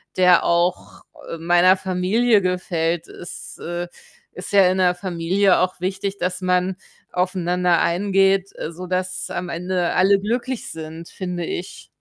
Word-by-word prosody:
der 180 -1 +5
auch, 175 +1 0 0.3
äh, 165 - -5
meiner 175 +3 +4
Familie 195 +5 +2
gefällt. 175 -2 -1
Es, 175 - -9
äh, 175 +1 -4 0.4
ist - - -8
ja 195 -2 +6
in 190 - -1
'ner 180 -1 +3
Familie 185 +2 +1
auch 185 -1 -1
wichtig, 195 +1 -3
dass 180 +1 -2
man 180 0 0 0.3
aufeinander 180 -1 +1
eingeht, 195 +1 +2
äh, 160 - -5
sodass 185 +1 -3
am 180 - -4
Ende 180 +1 -1
alle 195 +1 +4
glücklich 240 +3 -3
sind, 160 +1 -8
finde 180 -3 -4
ich. 180 - -6
180 Hz, 140 wpm, -21 LUFS, 175-190 Hz, 0.4 s, ja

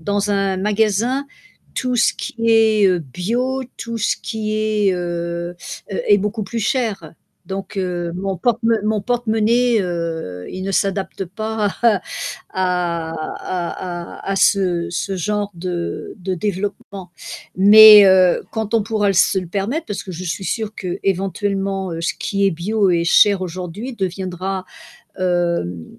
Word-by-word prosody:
dans 205 +4 -1
un 195 -1 +1
magasin, 220 +7 +1 0.5
tout 250 -1 -1
ce 240 - +3
qui - - -6 0.2
est, 220 -2 +5
heu, 180 -1 +2
bio, 235 - -2
tout 230 0 -5
ce 210 - +1
qui 215 -2 -3
est, 215 -2 +1
heu, 170 0 -3 0.4
heu - - -2
est 205 - +7
beaucoup 210 +2 -2
plus 235 - -4
cher. 215 - -1 0.3
Donc 195 +1 -5
heu, 175 -2 -2
mon 190 +1 -3
porte 230 +6 +1
mo 230 0 +3
mon 215 -1 +1
porte-monnaie, 235 +1 +2
heu, 165 - -4
il 185 - -6
ne 195 - -2
s'adapte 195 0 -1
pas 215 +3 -2
à 210 -5 +4 0.5
à 175 -3 -1
à 175 +2 -5
à - - -5
à - - -2
ce 185 -3 +2
ce 190 +2 -2
genre 205 +3 -1
de 175 0 -4
de 185 +1 -3
développement. 195 -1 -4 0.5
Mais 210 +1 +10
heu, 185 -2 +5
quand 220 0 -3
on 225 - +4
pourra 215 -1 0
l 195 - +1
se 190 - +4
le 185 - -4
permettre, 205 - -2
parce 205 - -4
que 185 - -8
je 180 +2 -6
suis 170 +2 -3
sûre 220 +1 -3
qu'éventuellement, 195 0 -2
heu, 165 - -4
ce 170 - 0
qui 200 -1 -1
est - - +3
bio 195 +4 0
et 170 -1 +2
cher 200 +3 +5
aujourd'hui 185 +7 -5
deviendra, 185 -1 -3 0.5
hem, 170 - 0
195 Hz, 155 wpm, -19 LUFS, 180-215 Hz, 0.5 s, Mais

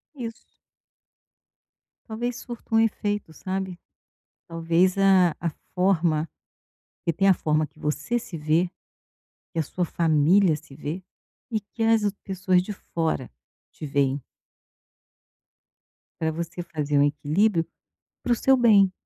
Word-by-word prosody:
Isso. 230 -4 -6 1.7
Talvez 235 +2 -3
surta 235 -2 -5
um - - +6
efeito, 205 -5 0
sabe? 190 0 -4 0.7
Talvez 165 +3 +2
a 190 -4 +5
a 170 - -1 0.2
forma 170 -4 +2 0.7
porque 170 - -1
tem 195 0 +3
a 190 - +7
forma 155 -1 +1
que 150 +2 -25
você 150 +10 -1
se 195 -7 -8
vê, 160 +4 +1 0.8
que 165 - -1
a - - +2
sua 180 +4 -2
família 165 +2 +3
se 150 -2 -15
vê, 155 +5 -5 0.5
e 220 -2 0
que 215 +3 -10
as 225 -1 +4 0.2
pessoas 185 -2 +1
de 205 +3 -5
fora 160 - -3 0.4
te 155 - -8
veem. 140 -1 +1 2.0
Para 160 -1 0
você 170 +2 -5
fazer 150 -4 -1
um 140 - +6
equilíbrio 165 +6 +2 0.6
para 245 - -1
o - - +5
seu 265 +3 +4
bem. 205 -6 +5
175 Hz, 130 wpm, -25 LUFS, 155-205 Hz, 2.0 s, a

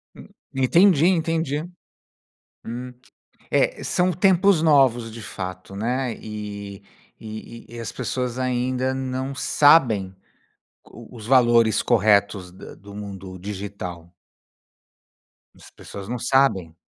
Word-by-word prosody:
Hum. - - -13 0.3
Entendi, 165 +5 +4
entendi. 165 -3 0 1.0
Hum, 125 +2 -6 0.6
é, - - +1
são 180 0 +1
tempos 185 0 +3
novos, 130 -7 +3
de 115 0 -9
fato, 95 -1 -7
né. 125 +3 -1
E 100 -2 -7 0.4
e 110 +1 -9
e - - -6
as 115 - -5
pessoas 125 -1 -3
ainda 130 +1 -1
não 130 +1 -4
sabem 120 - +3 0.7
qu 115 0 -14
os 115 -4 -10
valores 120 -3 +4
corretos 100 -4 +2
da 95 - -12
do 100 +1 -14
mundo 95 -2 -8
digital. 95 -3 -7 1.4
As - - -17
pessoas 100 -1 -10
não 125 0 -3
sabem. 120 -11 +1
120 Hz, 110 wpm, -23 LUFS, 100-135 Hz, 1.4 s, Entendi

